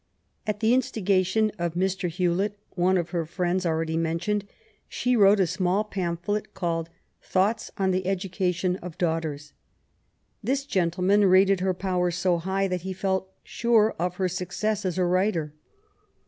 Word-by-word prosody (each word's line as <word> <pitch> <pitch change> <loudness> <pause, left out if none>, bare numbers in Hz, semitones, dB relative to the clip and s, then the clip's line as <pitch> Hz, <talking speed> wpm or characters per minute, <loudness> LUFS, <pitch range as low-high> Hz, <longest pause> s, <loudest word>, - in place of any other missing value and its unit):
At 210 -1 -2
the 225 +2 +4
instigation 210 -3 +1
of 170 -1 -2
Mr. 190 0 0
Hewlet, 185 +4 0 0.2
one 185 +1 +2
of 175 -1 -2
her 170 -2 0
friends 180 +2 -1
already 160 0 -1
mentioned, 170 +5 -1 0.4
she 250 0 0
wrote 200 -2 +6
a 190 - +4
small 185 +3 0
pamphlet 195 0 -3
called 165 -2 -2 0.3
Thoughts 200 +5 0
on 190 -2 +1
the 185 0 -1
Education 185 -1 -1
of 180 -3 -9
Daughters. 160 -4 -2 0.9
This 270 +5 0
gentle 180 -7 0
man 200 +2 +4
rated 190 +1 +5
her 185 0 0
powers 180 -2 0
so 175 -1 +1
high 190 +3 0
that 180 -1 -2
he 190 +2 -4
felt 190 0 -2
sure 225 -2 +2
of 180 +1 -1
her 185 0 0
success 190 +4 -2
as 185 -1 -1
a 185 - +2
writer. 175 -4 0
185 Hz, 155 wpm, -26 LUFS, 175-200 Hz, 0.9 s, wrote